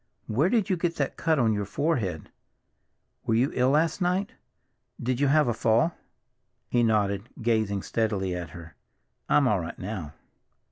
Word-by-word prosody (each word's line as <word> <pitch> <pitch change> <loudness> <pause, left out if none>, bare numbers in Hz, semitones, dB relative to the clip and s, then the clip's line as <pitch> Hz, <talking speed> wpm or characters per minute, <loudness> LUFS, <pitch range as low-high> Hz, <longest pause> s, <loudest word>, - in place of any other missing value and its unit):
"Where 135 +11 +1
did 220 -2 +2
you 185 -3 +1
get 170 0 -1
that 140 - -2
cut 160 -1 +1
on 115 -4 +3
your 105 -1 -1
forehead? 100 - -2 1.0
Were 110 - +3
you 125 +5 +2
ill 125 +1 +2
last 160 +6 +2
night? 180 +3 0 0.7
Did 125 +1 -1
you 145 - +3
have 150 +1 +4
a 120 - +1
fall?" 115 +8 +2 0.8
He 120 - +3
nodded, 105 -2 +1
gazing 110 -4 0
steadily 105 -5 -1
at 90 -1 -5
her. 80 -2 -11 0.6
"I'm 145 -3 +4
all 105 -5 +2
right 85 0 -6
now." 95 -7 -6
115 Hz, 160 wpm, -27 LUFS, 100-150 Hz, 1.0 s, have